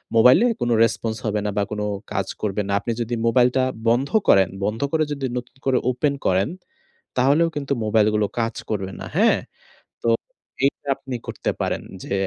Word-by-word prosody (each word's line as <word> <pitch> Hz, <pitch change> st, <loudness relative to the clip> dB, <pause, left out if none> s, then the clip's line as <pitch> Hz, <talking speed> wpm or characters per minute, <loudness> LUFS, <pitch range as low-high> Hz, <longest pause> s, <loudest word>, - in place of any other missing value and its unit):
মোবাইলে 125 Hz, -, +7 dB, 0.2 s
কোনো 120 Hz, -1 st, +2 dB
রেসপন্স 115 Hz, -1 st, 0 dB
হবে 105 Hz, -1 st, 0 dB
না 105 Hz, -, +1 dB
বা 100 Hz, -, +3 dB
কোনো 105 Hz, 0 st, -2 dB, 0.3 s
কাজ -, -, -1 dB
করবে 105 Hz, 0 st, -1 dB
না। -, -, -2 dB
আপনি 115 Hz, -, -3 dB
যদি 120 Hz, +1 st, -2 dB
মোবাইলটা 125 Hz, +2 st, +3 dB, 0.3 s
বন্ধ 125 Hz, +4 st, +2 dB, 0.2 s
করেন 95 Hz, -2 st, +5 dB, 0.2 s
বন্ধ 105 Hz, +2 st, -2 dB
করে 160 Hz, -1 st, +2 dB
যদি 140 Hz, -2 st, -4 dB
নতুন 125 Hz, +1 st, -7 dB
করে 130 Hz, -2 st, +3 dB
ওপেন 140 Hz, +3 st, 0 dB
করেন 95 Hz, +5 st, +2 dB, 0.7 s
তাহলেও 145 Hz, +6 st, +4 dB
কিন্তু 140 Hz, -1 st, -1 dB
মোবাইলগুলো 105 Hz, 0 st, +3 dB
কাজ 115 Hz, 0 st, -1 dB
করবে 100 Hz, -3 st, -2 dB
না। -, -, -6 dB
হ্যাঁ? -, -, +4 dB, 0.6 s
তো 115 Hz, -, +2 dB, 0.6 s
এইটা 140 Hz, +1 st, -1 dB
আপনি 135 Hz, -2 st, -6 dB
করতে -, -, -2 dB
পারেন -, -, -1 dB, 0.2 s
যে -, -, -4 dB
115 Hz, 170 wpm, -22 LUFS, 105-130 Hz, 0.7 s, মোবাইলে